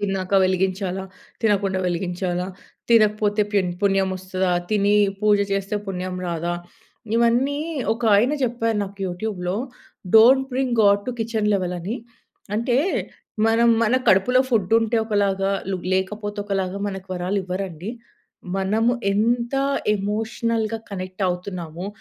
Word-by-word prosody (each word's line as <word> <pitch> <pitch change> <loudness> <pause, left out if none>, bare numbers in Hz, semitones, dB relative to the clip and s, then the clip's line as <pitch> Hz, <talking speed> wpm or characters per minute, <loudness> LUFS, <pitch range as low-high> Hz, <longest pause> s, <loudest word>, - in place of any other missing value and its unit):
తిన్నాక 195 -1 -2
వెలిగించాలా, 190 0 -1 0.4
తినకుండా 200 -3 +1
వెలిగించాలా, 180 0 -2 0.4
తినకపోతే 210 -2 +4
పెన్ 190 -3 +2
పుణ్యం 195 -1 +2
వస్తదా, 185 0 -2 0.2
తిని 205 0 +3 0.2
పూజ 210 -1 +4 0.2
చేస్తే 195 +1 -1
పుణ్యం 185 -1 -4
రాదా, 170 0 -2 0.6
ఇవన్నీ 240 +5 +2 0.4
ఒక 235 - -10
ఆయన 245 +7 +3
జెప్పారు 230 -3 0
నాకు 200 +1 -11
యూట్యూబ్‌లో, 180 0 -3 0.6
don't 265 +4 +7
bring 260 -1 0
God 200 0 +4
to - - -1
kitchen 220 -2 0
level 180 -2 -1
అని. 200 +8 -3 0.6
అంటే, 240 +2 +1 0.7
మనం 230 +1 +4
మన 230 +2 +2
కడుపులో 220 +7 +4
ఫుడ్డు 210 -4 +1
ఉంటే 225 +1 0
ఒకలాగా, 195 -2 +1 0.4
లేకపోతే 205 +2 -2
ఒకలాగా, 195 -1 -2
మనకి 190 -1 -5
వరాలివ్వరండి. 185 0 -3 0.7
మనము 215 +5 +1 0.2
ఎంత 235 +4 +1 0.4
ఎమోషనల్‌గా 220 +2 -1
కనెక్ట్ 185 0 -5
అవుతున్నామో, 180 -1 -5
200 Hz, 115 wpm, -22 LUFS, 185-225 Hz, 0.7 s, don't